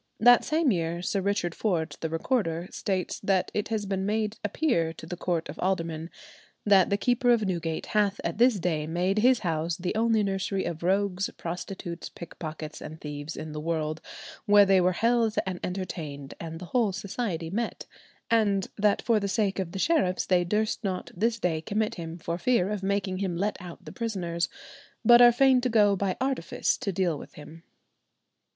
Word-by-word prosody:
That 245 Hz, +1 st, +7 dB
same 310 Hz, -3 st, +2 dB
year 170 Hz, -1 st, -1 dB
Sir 195 Hz, +1 st, 0 dB
Richard 185 Hz, -3 st, 0 dB
Ford, 175 Hz, -7 st, -1 dB
the 160 Hz, -, -3 dB
recorder, 165 Hz, -1 st, -1 dB
states 190 Hz, -2 st, -2 dB
that 195 Hz, -2 st, +1 dB
it 210 Hz, +1 st, -1 dB
has 220 Hz, -2 st, -2 dB
been 195 Hz, -1 st, -2 dB
made 215 Hz, +1 st, -1 dB
appear 205 Hz, -, 0 dB
to 160 Hz, -, -11 dB
the 180 Hz, -, -5 dB
court 170 Hz, -2 st, -2 dB
of 145 Hz, -, -9 dB
aldermen 165 Hz, -3 st, -1 dB, 0.6 s
"that 195 Hz, -3 st, +5 dB
the 200 Hz, -, +2 dB
keeper 245 Hz, +3 st, +1 dB
of 235 Hz, -3 st, +4 dB
Newgate 170 Hz, -4 st, -2 dB
hath 205 Hz, -1 st, +1 dB
at 170 Hz, +5 st, -3 dB
this 245 Hz, -2 st, +5 dB
day 160 Hz, -3 st, -1 dB
made 180 Hz, +5 st, 0 dB
his 250 Hz, +2 st, +4 dB
house 165 Hz, 0 st, -1 dB
the 180 Hz, -1 st, -2 dB
only 220 Hz, 0 st, +2 dB
nursery 195 Hz, 0 st, -1 dB
of 170 Hz, -2 st, -4 dB
rogues, 195 Hz, +1 st, +1 dB
prostitutes, 175 Hz, 0 st, -6 dB
pickpockets, 155 Hz, -2 st, -8 dB
and 155 Hz, +1 st, -8 dB
thieves 145 Hz, +1 st, -6 dB
in 155 Hz, 0 st, -6 dB
the 150 Hz, -, -5 dB
world, 155 Hz, 0 st, -2 dB, 0.5 s
where 205 Hz, 0 st, +7 dB
they 190 Hz, -1 st, +4 dB
were 180 Hz, +1 st, +3 dB
held 230 Hz, +2 st, +2 dB
and 185 Hz, -2 st, -4 dB
entertained 155 Hz, -7 st, -5 dB
and 165 Hz, -1 st, -6 dB
the 180 Hz, -, -8 dB
whole 235 Hz, -5 st, +3 dB
society 190 Hz, -4 st, -4 dB
met, 230 Hz, +4 st, -3 dB, 0.5 s
and 205 Hz, -4 st, +2 dB
that 205 Hz, 0 st, +2 dB
for 230 Hz, -3 st, +3 dB
the 200 Hz, -, -2 dB
sake 200 Hz, -1 st, 0 dB
of 180 Hz, -3 st, -3 dB
the -, -, -6 dB
sheriffs[92:1] 235 Hz, -, +1 dB
they 180 Hz, -1 st, +4 dB
durst 215 Hz, +5 st, -1 dB
not 190 Hz, -2 st, -3 dB
this 225 Hz, +5 st, +1 dB
day 165 Hz, -6 st, -1 dB
commit 210 Hz, +5 st, -1 dB
him 165 Hz, -1 st, -6 dB
for 170 Hz, 0 st, -4 dB
fear 210 Hz, -3 st, +2 dB
of 210 Hz, -2 st, -2 dB
making 195 Hz, -1 st, -1 dB
him 185 Hz, -4 st, -2 dB
let 205 Hz, +4 st, 0 dB
out 175 Hz, -2 st, -10 dB
the -, -, -8 dB
prisoners, 175 Hz, -7 st, -2 dB, 0.6 s
but 240 Hz, +2 st, +8 dB
are 240 Hz, 0 st, +9 dB
fain 260 Hz, +1 st, +4 dB
to 250 Hz, -, 0 dB
go 210 Hz, -3 st, +4 dB
by 195 Hz, -1 st, -1 dB
artifice 260 Hz, -9 st, 0 dB
to 200 Hz, -, -3 dB
deal 175 Hz, -4 st, 0 dB
with -, -, -12 dB
him." 155 Hz, +2 st, -12 dB
190 Hz, 190 wpm, -27 LUFS, 170-215 Hz, 0.6 s, are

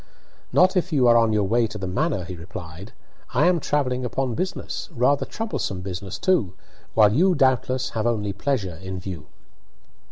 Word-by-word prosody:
"Not 185 Hz, +2 st, +4 dB
if 180 Hz, 0 st, 0 dB
you 135 Hz, -5 st, +3 dB
are 120 Hz, -, +6 dB
on 115 Hz, -1 st, +4 dB
your 105 Hz, -1 st, +2 dB
way 115 Hz, +4 st, +2 dB
to 105 Hz, -, -7 dB
the 100 Hz, -, -5 dB
manor," 95 Hz, +1 st, -1 dB
he 90 Hz, +1 st, -7 dB
replied. 85 Hz, +2 st, -9 dB, 0.4 s
"I 145 Hz, +5 st, +4 dB
am 175 Hz, -1 st, +4 dB
travelling 130 Hz, -4 st, 0 dB
upon 125 Hz, +1 st, -1 dB
business, 185 Hz, -, -4 dB
rather 130 Hz, +4 st, +1 dB
troublesome 210 Hz, -, -3 dB
business 95 Hz, 0 st, -5 dB
too, 160 Hz, -, +1 dB, 0.4 s
while 105 Hz, -2 st, +6 dB
you, 180 Hz, -, +4 dB
doubtless, 130 Hz, -2 st, +1 dB
have 110 Hz, 0 st, -1 dB
only 105 Hz, -4 st, -1 dB
pleasure 100 Hz, -, -2 dB
in 95 Hz, 0 st, -5 dB
view." 90 Hz, -5 st, -7 dB
115 Hz, 170 wpm, -24 LUFS, 95-140 Hz, 0.4 s, are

